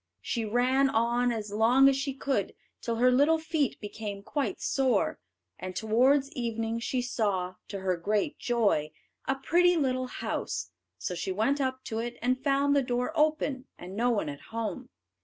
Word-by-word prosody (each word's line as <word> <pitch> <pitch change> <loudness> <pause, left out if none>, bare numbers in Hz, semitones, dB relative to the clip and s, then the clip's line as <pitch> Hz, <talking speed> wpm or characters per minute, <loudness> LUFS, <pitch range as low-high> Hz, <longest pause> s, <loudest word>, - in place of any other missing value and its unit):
She 230 -2 -2
ran 255 +5 +3
on 240 +1 +2
as 215 -3 -4
long 235 +6 +5
as 275 - +4
she 275 0 -2
could 275 0 -1 0.3
till 230 -2 -2
her 250 +2 +4
little 290 +6 +4
feet 315 -3 -1
became 205 -1 -6
quite 285 +5 -2
sore; 265 -2 +1 0.4
and 185 0 -6
towards 260 +7 +3
evening 230 -2 -2
she 250 +1 -1
saw, 195 -7 -1
to 200 -2 -6
her 185 -1 +1
great 205 +4 -1
joy, 205 -11 +1 0.3
a 270 - +2
pretty 350 +6 +3
little 255 -3 0
house. - - -4 0.3
So 180 - -3
she 180 +2 -3
went 225 +9 +1
up 260 -1 -2
to 220 - -3
it, 240 +1 -4
and 255 +2 0
found 280 0 +3
the 280 - +4
door 250 +1 -1
open 300 -4 +1
and 185 +2 -9
no 240 +3 +2
one 220 -8 0
at 145 -1 -6
home. 230 +3 -4
245 Hz, 175 wpm, -29 LUFS, 220-270 Hz, 0.4 s, long